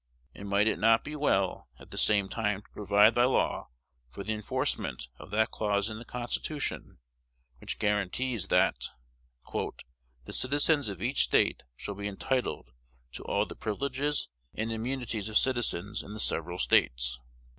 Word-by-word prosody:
And 100 Hz, 0 st, -8 dB
might 100 Hz, +1 st, +3 dB
it 110 Hz, -, +1 dB
not 115 Hz, +1 st, +5 dB
be 150 Hz, -, -6 dB
well 95 Hz, -, 0 dB
at -, -, -15 dB
the -, -, -7 dB
same 100 Hz, -2 st, +4 dB
time 105 Hz, -2 st, -1 dB
to -, -, -25 dB
provide 105 Hz, +2 st, +5 dB
by 120 Hz, 0 st, +4 dB
law 130 Hz, -, +1 dB, 0.4 s
for 70 Hz, +11 st, -7 dB
the 110 Hz, -, -1 dB
enforcement 80 Hz, -, -2 dB
of -, -, -11 dB
that 110 Hz, +2 st, +1 dB
clause 105 Hz, 0 st, 0 dB
in 110 Hz, -, -6 dB
the 120 Hz, -, -10 dB
Constitution 125 Hz, +5 st, -3 dB, 0.6 s
which -, -, -4 dB
guarantees 105 Hz, +2 st, 0 dB
that 90 Hz, -, +2 dB, 0.7 s
"the 60 Hz, -1 st, -7 dB
citizens 145 Hz, -1 st, +3 dB
of 100 Hz, -, -6 dB
each 130 Hz, +4 st, +2 dB
State -, -, +2 dB
shall 100 Hz, -, -5 dB
be 100 Hz, +1 st, -4 dB
entitled 105 Hz, -, -2 dB, 0.4 s
to -, -, -8 dB
all -, -, +1 dB
the -, -, -9 dB
privileges 140 Hz, +6 st, -1 dB, 0.3 s
and 110 Hz, +1 st, -2 dB
immunities 115 Hz, -2 st, -2 dB
of 110 Hz, -, +3 dB
citizens 120 Hz, -6 st, +1 dB
in 105 Hz, -, -9 dB
the 110 Hz, -, -7 dB
several 85 Hz, -3 st, 0 dB
States"? -, -, +3 dB
105 Hz, 155 wpm, -30 LUFS, 100-120 Hz, 0.7 s, not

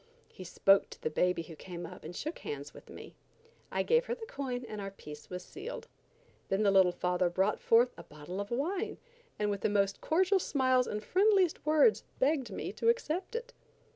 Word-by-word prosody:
He 185 Hz, -, -9 dB
spoke 195 Hz, +2 st, +3 dB
to -, -, -12 dB
the 155 Hz, -, -1 dB
baby 180 Hz, +1 st, +1 dB
who 165 Hz, 0 st, -11 dB
came 175 Hz, +1 st, -7 dB
up -, -, -10 dB
and 170 Hz, +3 st, -8 dB
shook 310 Hz, -, -4 dB
hands 145 Hz, 0 st, -6 dB
with -, -, -14 dB
me. -, -, -10 dB, 0.6 s
I -, -, 0 dB
gave 475 Hz, +1 st, +3 dB
her 475 Hz, -, -2 dB
the 460 Hz, -, -8 dB
coin 260 Hz, -, -4 dB
and 215 Hz, -1 st, -6 dB
our 195 Hz, -, -4 dB
peace 150 Hz, -6 st, -11 dB
was 180 Hz, 0 st, -6 dB
sealed. 420 Hz, +6 st, -7 dB, 0.6 s
Then 195 Hz, +2 st, +1 dB
the 200 Hz, -, +4 dB
little 190 Hz, -2 st, +5 dB
father 180 Hz, 0 st, 0 dB
brought 190 Hz, +4 st, +1 dB
forth 235 Hz, +2 st, +4 dB
a -, -, -9 dB
bottle 150 Hz, +6 st, -7 dB
of 200 Hz, -, -6 dB
wine, 370 Hz, -, -2 dB, 0.4 s
and 210 Hz, 0 st, 0 dB
with 200 Hz, -1 st, -3 dB
the -, -, +1 dB
most 200 Hz, -1 st, +1 dB
cordial 375 Hz, +4 st, +3 dB
smiles 255 Hz, -6 st, +2 dB
and 210 Hz, +1 st, -4 dB
friendliest 380 Hz, -, +3 dB
words, 310 Hz, +8 st, +4 dB
begged 270 Hz, -3 st, +1 dB
me 195 Hz, -, -4 dB
to 460 Hz, -, +1 dB
accept 420 Hz, -3 st, -1 dB
it. -, -, -5 dB
215 Hz, 200 wpm, -31 LUFS, -, 0.6 s, little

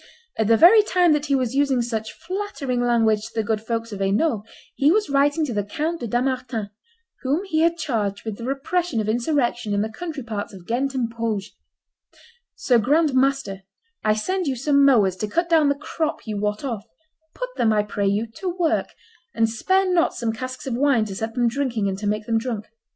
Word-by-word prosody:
At 220 Hz, -, 0 dB
the 225 Hz, 0 st, +5 dB
very 395 Hz, -, +8 dB
time 360 Hz, -5 st, +3 dB
that 300 Hz, 0 st, -1 dB
he 280 Hz, -, +2 dB
was 255 Hz, -2 st, 0 dB
using 270 Hz, -3 st, +2 dB
such 225 Hz, -2 st, -4 dB
flattering 335 Hz, -9 st, -3 dB
language 225 Hz, -3 st, +2 dB
to -, -, -16 dB
the 220 Hz, -, +1 dB
good 215 Hz, 0 st, -1 dB
folks 230 Hz, 0 st, -3 dB
of 200 Hz, -, -6 dB
Hainault, 205 Hz, +5 st, +1 dB, 0.3 s
he 285 Hz, +3 st, +3 dB
was 420 Hz, -3 st, +1 dB
writing 285 Hz, +3 st, +3 dB
to 255 Hz, -, -4 dB
the 205 Hz, -1 st, 0 dB
Count 310 Hz, +11 st, -3 dB
de 240 Hz, -, -4 dB
Dampmartin, 245 Hz, -3 st, -2 dB, 0.5 s
whom 285 Hz, +8 st, 0 dB
he 325 Hz, -5 st, 0 dB
had 335 Hz, +1 st, +3 dB
charged 210 Hz, -10 st, -2 dB
with 220 Hz, -2 st, -3 dB
the -, -, -8 dB
repression 275 Hz, +2 st, -1 dB
of 215 Hz, -, -1 dB
insurrection 240 Hz, -2 st, 0 dB
in 200 Hz, -, +1 dB
the 220 Hz, -, -4 dB
country 310 Hz, +1 st, -6 dB
parts 210 Hz, -3 st, -5 dB
of 180 Hz, -2 st, -13 dB
Ghent 265 Hz, +5 st, -1 dB
and 250 Hz, -3 st, 0 dB
Bruges, 225 Hz, -3 st, -3 dB, 1.0 s
"Sir 245 Hz, -3 st, +3 dB
Grand 295 Hz, +6 st, +2 dB
Master, 260 Hz, -7 st, +1 dB, 0.4 s
I 215 Hz, 0 st, +3 dB
send 370 Hz, -, -1 dB
you 270 Hz, -, 0 dB
some 280 Hz, +3 st, +3 dB
mowers 215 Hz, -9 st, +4 dB
to 215 Hz, -, -2 dB
cut 340 Hz, +11 st, -1 dB
down 315 Hz, -4 st, +4 dB
the 280 Hz, -, +2 dB
crop 310 Hz, +2 st, -3 dB
you 215 Hz, -2 st, -4 dB
wot 210 Hz, +2 st, -2 dB
off; 230 Hz, -6 st, -3 dB, 0.5 s
put -, -, -4 dB
them, 225 Hz, -, +2 dB
I 210 Hz, -1 st, +2 dB
pray 205 Hz, -1 st, -2 dB
you, 205 Hz, +3 st, +1 dB
to 375 Hz, -, -3 dB
work, 345 Hz, -2 st, 0 dB, 0.5 s
and 225 Hz, -, +3 dB
spare 375 Hz, +13 st, +1 dB
not 340 Hz, -2 st, +2 dB
some 230 Hz, -2 st, -2 dB
casks 255 Hz, +3 st, -6 dB
of 265 Hz, -, -2 dB
wine 255 Hz, -3 st, +2 dB
to 195 Hz, -2 st, -6 dB
set 225 Hz, +3 st, -4 dB
them 245 Hz, -1 st, +2 dB
drinking, 235 Hz, -4 st, -1 dB
and 190 Hz, 0 st, -3 dB
to 210 Hz, -, -3 dB
make 210 Hz, +1 st, -1 dB
them 225 Hz, 0 st, +1 dB
drunk. 225 Hz, -3 st, -4 dB
245 Hz, 210 wpm, -23 LUFS, 220-295 Hz, 1.0 s, very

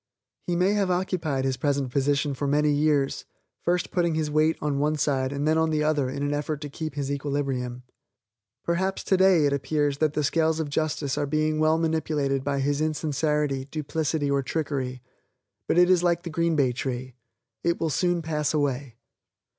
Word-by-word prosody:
He 175 Hz, -, 0 dB
may 185 Hz, +3 st, +3 dB
have 200 Hz, -3 st, +1 dB
occupied 175 Hz, -7 st, -1 dB
his 130 Hz, -1 st, 0 dB
present 140 Hz, -1 st, 0 dB
position 140 Hz, +1 st, +1 dB
for 140 Hz, +1 st, -3 dB
many 150 Hz, +1 st, +3 dB
years, 145 Hz, -2 st, +1 dB, 0.4 s
first 175 Hz, +1 st, 0 dB
putting 170 Hz, -3 st, +1 dB
his 155 Hz, -1 st, -1 dB
weight 155 Hz, +1 st, +2 dB
on 145 Hz, -2 st, -1 dB
one 150 Hz, +2 st, +1 dB
side 135 Hz, -3 st, 0 dB
and 140 Hz, +1 st, -2 dB
then 160 Hz, +1 st, +3 dB
on 160 Hz, 0 st, +2 dB
the 155 Hz, -1 st, +1 dB
other 150 Hz, -4 st, +1 dB
in 140 Hz, +2 st, -4 dB
an 145 Hz, 0 st, 0 dB
effort 145 Hz, 0 st, -2 dB
to 145 Hz, -, -5 dB
keep 155 Hz, -1 st, -5 dB
his 140 Hz, -1 st, -2 dB
equilibrium. 135 Hz, -3 st, -2 dB, 0.8 s
Perhaps 190 Hz, +3 st, -1 dB
today 190 Hz, -4 st, +4 dB
it 140 Hz, -, +2 dB
appears 145 Hz, 0 st, 0 dB
that 155 Hz, -2 st, +2 dB
the 150 Hz, -, 0 dB
scales 160 Hz, +2 st, +1 dB
of 150 Hz, -3 st, -3 dB
justice 145 Hz, -2 st, -1 dB
are 145 Hz, -, -1 dB
being 155 Hz, +1 st, 0 dB
well 155 Hz, +1 st, +3 dB
manipulated 155 Hz, -4 st, 0 dB
by 140 Hz, 0 st, -1 dB
his 145 Hz, +2 st, 0 dB
insincerity, 150 Hz, -2 st, 0 dB
duplicity 150 Hz, 0 st, -2 dB
or 140 Hz, 0 st, +2 dB
trickery 130 Hz, -3 st, -3 dB, 0.6 s
but -, -, +1 dB
it 180 Hz, 0 st, +6 dB
is 185 Hz, -1 st, +4 dB
like 175 Hz, -1 st, +1 dB
the 170 Hz, -, -6 dB
green 165 Hz, 0 st, +1 dB
bay 135 Hz, -4 st, +3 dB
tree. 130 Hz, +1 st, -4 dB, 0.5 s
It 170 Hz, 0 st, +1 dB
will 160 Hz, -2 st, 0 dB
soon 175 Hz, +1 st, +1 dB
pass 155 Hz, -1 st, -1 dB
away. 140 Hz, -4 st, -1 dB
150 Hz, 185 wpm, -26 LUFS, 140-160 Hz, 0.8 s, it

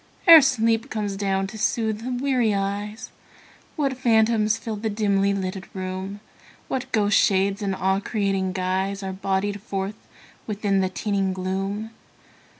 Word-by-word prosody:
Ere 330 Hz, -3 st, +11 dB
sleep 230 Hz, -1 st, +1 dB
comes 210 Hz, -4 st, -3 dB
down 195 Hz, -1 st, 0 dB
to 215 Hz, +3 st, -8 dB
soothe 220 Hz, 0 st, 0 dB
the 245 Hz, -, -5 dB
weary 250 Hz, -6 st, +2 dB
eyes, 205 Hz, +3 st, -3 dB, 0.6 s
What 275 Hz, -3 st, 0 dB
phantoms 225 Hz, -3 st, +3 dB
fill 225 Hz, -1 st, -5 dB
the 220 Hz, +1 st, -3 dB
dimly 200 Hz, -2 st, +1 dB
lighted 190 Hz, -1 st, -3 dB
room; 190 Hz, +2 st, -5 dB, 0.5 s
What 260 Hz, 0 st, -3 dB
ghostly 210 Hz, -3 st, +2 dB, 0.3 s
shades 195 Hz, +2 st, 0 dB
in 195 Hz, -2 st, -1 dB
awe 190 Hz, +1 st, +1 dB
creating 195 Hz, -3 st, -1 dB
guise 190 Hz, +2 st, -1 dB
Are 190 Hz, 0 st, -4 dB
bodied 195 Hz, +1 st, -2 dB
forth 200 Hz, -1 st, -5 dB, 0.4 s
within 205 Hz, -2 st, 0 dB
the 190 Hz, -1 st, +1 dB
teeming 195 Hz, -1 st, -1 dB
gloom. 195 Hz, +4 st, -3 dB
200 Hz, 145 wpm, -24 LUFS, 195-220 Hz, 0.6 s, Ere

